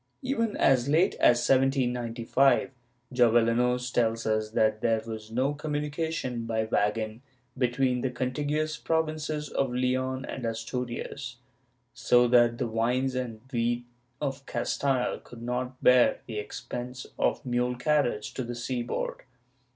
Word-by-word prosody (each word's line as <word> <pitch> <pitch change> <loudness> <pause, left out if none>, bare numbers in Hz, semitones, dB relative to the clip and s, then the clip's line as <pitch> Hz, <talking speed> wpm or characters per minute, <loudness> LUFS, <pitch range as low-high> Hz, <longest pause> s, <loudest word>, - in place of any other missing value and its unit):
Even 230 -5 -1
as 135 -1 +3
late 160 +5 +4
as 120 0 +4
1795, 130 -1 +2 0.4
Jovellanos 120 +1 +3
tells 115 -1 +1
us 110 0 0
that 110 0 +1
there 115 -1 +1
was 110 -1 -7
no 130 +5 0
com 150 +1 -5
munication 150 -5 -2
by 110 -1 0
wagon 110 +1 -1 0.3
between 125 0 +1
the 130 - 0
contiguous 145 +5 -2
provinces 155 -2 -1
of 135 - 0
Leon 130 +1 -1
and 130 - -6
Asturias, 120 +3 -4 0.6
so 125 0 +4
that 120 -1 +5
the - - -1
wines 125 +4 0
and 120 -4 -4
wheat 120 +1 0 0.3
of 135 -2 -3
Castile 125 +1 0
could 120 -1 -12
not 125 +1 -3
bear 125 -1 +5
the 110 -2 -4
expense 125 +3 -6
of - - +1
mule 125 0 0
carriage 125 -5 0
to 130 - -3
the 120 0 -5
seaboard. 120 0 -3
125 Hz, 130 wpm, -28 LUFS, 120-135 Hz, 0.6 s, that